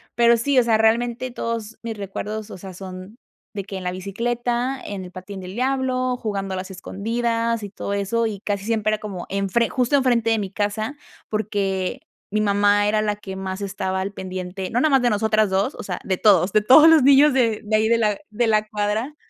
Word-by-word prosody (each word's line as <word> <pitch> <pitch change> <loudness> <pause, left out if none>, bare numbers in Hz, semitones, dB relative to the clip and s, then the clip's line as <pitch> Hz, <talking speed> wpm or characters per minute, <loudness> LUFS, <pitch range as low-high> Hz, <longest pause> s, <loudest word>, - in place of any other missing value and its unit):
pero 235 0 +5
sí, 265 +2 +2
o - - +4
sea, 225 -2 +3
realmente 235 +3 +1
todos 230 -2 -4
mis 225 -2 -5
recuerdos, 210 +2 -5
o - - -8
sea, 190 +1 -9
son 185 +4 -9 0.4
de 200 -2 -4
que 195 -1 -7
en 185 - -7
la 180 - -1
bicicleta, 240 +7 -2
en 195 -2 -5
el 180 - -11
patín 190 +2 -8
del 185 0 -8
diablo, 255 0 0
jugando 195 -4 -3
a - - -3
las 185 +1 -5
escondidas 230 +4 -2
y 200 - -5
todo 200 0 -5
eso, 210 +3 0
y 205 -3 -5
casi 200 -1 -3
siempre 215 -1 0
era 215 - +1
como 195 -4 -6
enfre 200 +4 0
justo 250 +2 +1
enfrente 245 -4 +2
de 225 - +3
mi 195 -2 -4
casa, 210 +5 -2 0.3
porque 200 +1 -2 0.3
mi 215 +1 0
mamá 205 0 +3
era 215 0 +2
la 210 -1 0
que 195 -2 -8
más 190 +1 -5
estaba 190 -1 -2
al 195 +2 -3
pendiente, 185 0 -5
no 240 - 0
nada 310 - +3
más 270 - +5
de 245 - +3
nosotras 215 -1 +2
2, 195 +8 0
o - - -7
sea, 180 -3 -4
de 185 -2 -1
todos, 190 -3 +4
de 215 +1 +4
todos 260 +8 +8
los 320 -2 +7
niños 280 +1 +6
de 230 -5 +1
de 215 +1 0
ahí 220 0 +3
de 230 +1 +3
la 210 -3 +1
de 225 +2 0
la 215 -1 +2
cuadra, 215 +6 -2
215 Hz, 220 wpm, -22 LUFS, 195-235 Hz, 0.4 s, todos